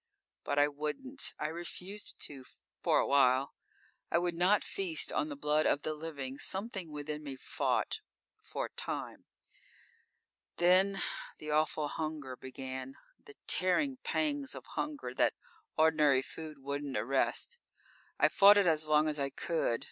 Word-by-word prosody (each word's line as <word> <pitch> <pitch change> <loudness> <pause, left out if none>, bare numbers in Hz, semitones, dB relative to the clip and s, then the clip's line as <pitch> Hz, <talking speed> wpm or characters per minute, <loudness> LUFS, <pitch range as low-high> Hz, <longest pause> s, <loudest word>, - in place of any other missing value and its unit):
"_ - - -3
_But 145 - +1
I 145 0 +6
wouldn't; 150 - -2
I - - -3
refused 180 +5 -5
to 135 -3 -4 0.4
for - - +3
a - - +3
while. 135 -1 +4 0.6
I - - +3
would 175 0 +1
not 180 +4 +3
feast 175 -5 -1
on 150 - 0
the 145 - -5
blood 150 +2 +2
of 145 - +1
the 155 - -1
living. 140 -4 -6
Something 190 -3 -1
within 150 0 -5
me 140 -3 -6
fought. - - -1 0.4
For - - -4
a - - -8
time._ - - -5 1.3
_Then, 185 +3 +4 0.3
the 150 0 -6
awful 155 0 +1
hunger 150 -4 -4
began. 130 0 -7 0.3
The 425 -2 -14
tearing 260 +9 +2
pangs 285 0 -1
of - - -9
hunger 295 -1 -3
that - - +2 0.4
ordinary 150 -4 +4
food 155 0 -7
wouldn't 140 -1 -4
arrest. 135 - 0 0.6
I - - +5
fought 200 +1 +7
it 200 - +5
as 155 -2 +3
long 155 0 +4
as 150 -1 -1
I 140 0 0
could. 140 -4 -1
155 Hz, 150 wpm, -33 LUFS, 140-185 Hz, 1.3 s, fought